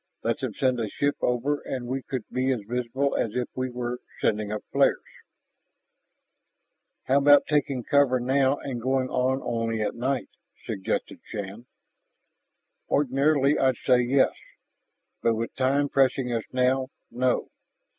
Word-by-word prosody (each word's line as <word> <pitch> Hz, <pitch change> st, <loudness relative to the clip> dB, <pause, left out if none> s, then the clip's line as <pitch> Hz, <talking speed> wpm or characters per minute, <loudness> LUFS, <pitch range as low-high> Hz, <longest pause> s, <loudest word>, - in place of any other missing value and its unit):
Let 115 Hz, +5 st, 0 dB
them 130 Hz, -7 st, -4 dB
send 130 Hz, -2 st, +1 dB
a 110 Hz, -2 st, -2 dB
ship 145 Hz, +7 st, 0 dB
over 130 Hz, +4 st, 0 dB
and 130 Hz, -2 st, -4 dB
we 130 Hz, +2 st, -3 dB
could 130 Hz, -3 st, -5 dB
be 130 Hz, +1 st, +1 dB
as 125 Hz, -4 st, -1 dB
visible 125 Hz, +3 st, -1 dB
as 110 Hz, -, -1 dB
if 125 Hz, -1 st, -1 dB
we 130 Hz, 0 st, -2 dB
were 120 Hz, 0 st, -4 dB, 0.2 s
sending 105 Hz, -1 st, 0 dB
up 105 Hz, -, -4 dB
flares -, -, +4 dB, 1.0 s
" -, -, -52 dB
"How 135 Hz, +2 st, +3 dB
about 145 Hz, 0 st, +6 dB
taking 145 Hz, -4 st, 0 dB
cover 135 Hz, -1 st, +3 dB
now 135 Hz, +2 st, +2 dB
and 125 Hz, -4 st, -5 dB
going 130 Hz, +1 st, 0 dB
on 130 Hz, +1 st, 0 dB
only 115 Hz, -1 st, -1 dB
at -, -, -1 dB
night?" 130 Hz, +2 st, -2 dB, 0.4 s
suggested 95 Hz, -, -3 dB
Shann. 105 Hz, +3 st, -7 dB, 1.2 s
"Ordinarily, 140 Hz, +1 st, +2 dB
I'd 130 Hz, -2 st, +2 dB
say 125 Hz, -2 st, +5 dB
yes. 130 Hz, +2 st, +3 dB, 0.9 s
But 115 Hz, -1 st, +2 dB
with 115 Hz, +1 st, -3 dB
time 135 Hz, +2 st, +2 dB
pressing 135 Hz, -2 st, +2 dB
us 115 Hz, -2 st, -2 dB
now, 130 Hz, +1 st, +2 dB, 0.2 s
no. 125 Hz, +1 st, 0 dB
130 Hz, 145 wpm, -26 LUFS, 120-135 Hz, 1.2 s, about